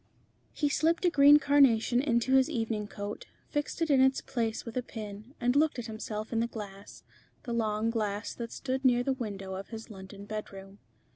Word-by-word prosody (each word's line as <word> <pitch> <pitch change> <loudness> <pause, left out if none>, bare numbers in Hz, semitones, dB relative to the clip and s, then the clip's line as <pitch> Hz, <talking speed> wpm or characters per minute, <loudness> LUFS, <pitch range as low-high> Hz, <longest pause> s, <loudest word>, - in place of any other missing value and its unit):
He 295 - 0
slipped 325 +5 +1
a 350 - +4
green 290 -1 +8
carnation 265 -5 +4
into 255 -2 +1
his 265 +2 +5
evening 225 -6 -2
coat, 205 - -7 0.2
fixed 295 +3 -2
it 320 - 0
in 270 -2 +5
its 265 0 +4
place 225 -3 -3
with 230 - -7
a 250 - +1
pin, 215 +2 -9
and 245 +2 +1
looked 300 -1 +3
at 240 - -4
himself 215 0 -5
in 225 - +1
the 230 - +1
glass, 200 -3 -9 0.4
the 240 - -4
long 220 -1 0
glass 210 -2 -2
that 230 -1 -6
stood 260 0 -3
near 245 -2 +4
the 270 - +1
window 200 -6 -5
of 190 +1 -6
his 225 0 -9
London 195 0 -10
bedroom. 200 -2 -7
230 Hz, 195 wpm, -30 LUFS, 210-265 Hz, 0.4 s, green